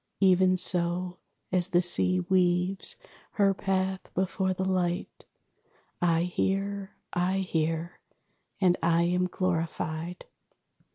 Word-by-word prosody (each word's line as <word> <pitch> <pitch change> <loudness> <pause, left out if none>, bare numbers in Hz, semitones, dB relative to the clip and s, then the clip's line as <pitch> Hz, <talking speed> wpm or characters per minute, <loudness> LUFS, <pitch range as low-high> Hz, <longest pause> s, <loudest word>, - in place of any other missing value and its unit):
Even 185 -1 +4
so, 180 0 +2 0.3
As 180 -1 +2
the 175 -2 +3
Sea 185 +1 +3
weaves 180 +1 +1 0.4
her 200 -2 +3
path 190 -1 -2
before 190 +1 0
the 185 0 -2
light, 180 -2 -2 0.8
I 170 -1 +2
hear, 195 +2 -2 0.2
I 180 +2 0
hear, 165 -1 -2 0.6
and 180 -2 +3
I 170 +1 +2
am 180 +1 +1
glorified. 170 -1 -3
180 Hz, 105 wpm, -28 LUFS, 175-190 Hz, 0.8 s, Even